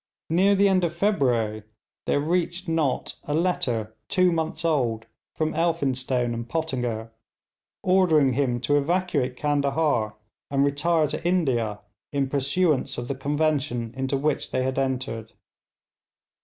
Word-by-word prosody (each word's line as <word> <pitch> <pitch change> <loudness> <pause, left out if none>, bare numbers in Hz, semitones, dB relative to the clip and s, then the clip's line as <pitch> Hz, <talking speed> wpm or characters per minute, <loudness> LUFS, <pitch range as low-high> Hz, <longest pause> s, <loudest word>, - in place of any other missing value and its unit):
Near 195 +4 +4
the 200 +1 +4
end 190 -2 +3
of 170 -1 -1
February 125 - +1 0.5
there - - +2
reached 175 +4 -1
Nott 160 -5 -1
a 145 - -1
letter 120 -11 0
two 185 -1 +4
months 160 0 -2
old 120 -9 +1 0.3
from 155 0 -1
Elphinstone 130 -7 0
and 115 0 -5
Pottinger, 125 -8 -2 0.7
ordering 165 -8 +4
him 125 -2 0
to 145 +2 +3
evacuate 145 -5 0
Candahar 145 -6 +1 0.3
and 140 0 +2
retire 155 +3 +2
to - - -4
India, 130 - 0 0.3
in 140 -2 0
pursuance 145 +2 +1
of 120 0 -5
the - - 0
convention 140 -4 -1
into 135 +1 -1
which 150 +2 -1
they 130 - 0
had 130 +1 -1
entered. 130 -4 -3
145 Hz, 130 wpm, -25 LUFS, 125-165 Hz, 0.7 s, Near